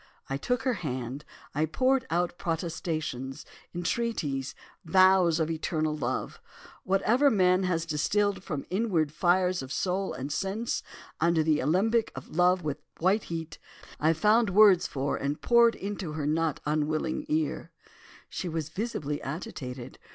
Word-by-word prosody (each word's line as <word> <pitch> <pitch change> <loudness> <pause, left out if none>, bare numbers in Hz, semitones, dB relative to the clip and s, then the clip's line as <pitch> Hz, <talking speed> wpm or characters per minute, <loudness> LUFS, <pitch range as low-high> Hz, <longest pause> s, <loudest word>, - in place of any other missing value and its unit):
I - - +1
took 245 - -1
her 260 -2 +1
hand, 130 -1 -4 0.3
I 155 +3 +1
poured 260 - +1
out 175 +1 -1
protestations, 160 -6 -3 0.3
entreaties, 170 - -2 0.3
vows 185 -1 +5
of 160 0 0
eternal 155 -1 -1
love; - - -3 0.4
whatever 225 +9 +3
man 185 -5 +3
has 165 -2 0
distilled 195 +6 0
from 155 -8 -3
the - - -18
inward 185 -7 +1
fires 180 +2 +2
of 130 0 -8
soul 190 +4 -1
and 135 +3 -5
sense, 195 +9 -2 0.4
under 170 -1 +3
the 155 -1 +2
alembic 210 - +2
of - - -9
love 180 0 +3
at 145 0 -2 0.2
white 190 +5 +2
heat, 165 -1 -6 0.4
I 160 +2 +3
found 210 +6 +3
words 195 -2 +6
for 140 0 -2
and 140 +2 -2
poured 235 -1 +5
into 195 -5 -5
her 155 -2 -3
not 160 0 0
unwilling 155 - -1
ear. 310 +1 -1 0.6
"She 180 - -4
was 160 -2 -3
visibly 160 -7 -3
agitated. 135 - -6
170 Hz, 145 wpm, -28 LUFS, 150-195 Hz, 0.6 s, words